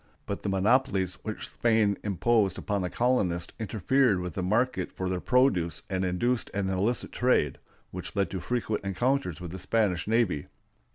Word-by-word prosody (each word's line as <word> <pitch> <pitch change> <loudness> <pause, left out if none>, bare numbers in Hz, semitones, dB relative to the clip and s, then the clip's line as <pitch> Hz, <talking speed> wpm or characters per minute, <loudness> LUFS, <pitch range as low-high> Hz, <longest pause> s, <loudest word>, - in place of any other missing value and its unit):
But 100 - -4
the 100 - -2
monopolies 95 -2 +2
which 110 -1 -5
Spain 110 -3 +2
imposed 105 0 +2
upon 100 -1 -2
the 90 - -2
colonists 95 -9 0
interfered 110 +1 +2
with 90 -2 -4
the 95 - -3
market 105 +1 0
for 95 - -4
their 90 -1 -1
produce 90 - +2
and 95 0 0
induced 110 +7 0
an 100 -1 0
illicit 100 +6 0
trade, 120 - +1 0.3
which 90 +2 -7
led 100 -1 0
to 95 - -3
frequent 110 +1 -2
encounters 100 - 0
with 90 -2 -7
the 95 - -6
Spanish 100 -6 0
navy. 110 -10 +1
100 Hz, 165 wpm, -28 LUFS, 90-120 Hz, 0.3 s, monopolies